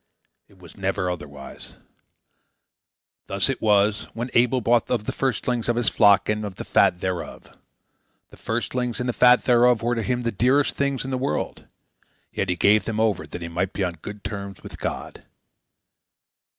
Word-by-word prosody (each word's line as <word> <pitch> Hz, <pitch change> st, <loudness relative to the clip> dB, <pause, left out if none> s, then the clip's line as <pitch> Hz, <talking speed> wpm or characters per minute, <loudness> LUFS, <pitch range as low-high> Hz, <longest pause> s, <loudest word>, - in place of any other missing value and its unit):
It 100 Hz, -, -23 dB
was 90 Hz, -3 st, -15 dB
never 95 Hz, -1 st, -1 dB
otherwise. 70 Hz, -5 st, -9 dB, 1.5 s
Thus 100 Hz, +5 st, +1 dB
it 135 Hz, -, -2 dB
was 105 Hz, 0 st, +2 dB
when 120 Hz, +2 st, -4 dB
Abel 125 Hz, +2 st, +3 dB
brought 120 Hz, 0 st, +2 dB
of 120 Hz, -4 st, 0 dB
the -, -, -2 dB
firstlings 125 Hz, -2 st, -1 dB
of 120 Hz, -, +2 dB
his 120 Hz, -1 st, +1 dB
flock 100 Hz, -2 st, +4 dB
and 105 Hz, 0 st, -1 dB
of 100 Hz, -3 st, -6 dB
the -, -, -7 dB
fat 90 Hz, -, +3 dB
thereof. 95 Hz, -2 st, -5 dB, 0.8 s
The -, -, -15 dB
firstlings 120 Hz, +1 st, -2 dB
and 125 Hz, -, -2 dB
the 125 Hz, -, 0 dB
fat 125 Hz, +1 st, +5 dB
thereof 120 Hz, -1 st, +4 dB
were 120 Hz, +1 st, +1 dB
to 115 Hz, -, -1 dB
him 125 Hz, +2 st, -1 dB
the 115 Hz, -, 0 dB
dearest 130 Hz, +7 st, +2 dB
things 140 Hz, -2 st, -1 dB
in 135 Hz, -, -5 dB
the 130 Hz, -, -1 dB
world; 135 Hz, +2 st, -3 dB, 0.7 s
yet 100 Hz, -, -2 dB
he 90 Hz, -, +1 dB
gave 100 Hz, +2 st, +3 dB
them 110 Hz, -1 st, -3 dB
over 110 Hz, -5 st, 0 dB
that 85 Hz, -, -7 dB
he -, -, -4 dB
might 90 Hz, +3 st, -2 dB
be 100 Hz, -, -2 dB
on 90 Hz, -2 st, -1 dB
good 105 Hz, 0 st, -8 dB
terms 100 Hz, -2 st, -6 dB
with -, -, -10 dB
God. -, -, -5 dB
110 Hz, 180 wpm, -23 LUFS, 100-125 Hz, 1.5 s, fat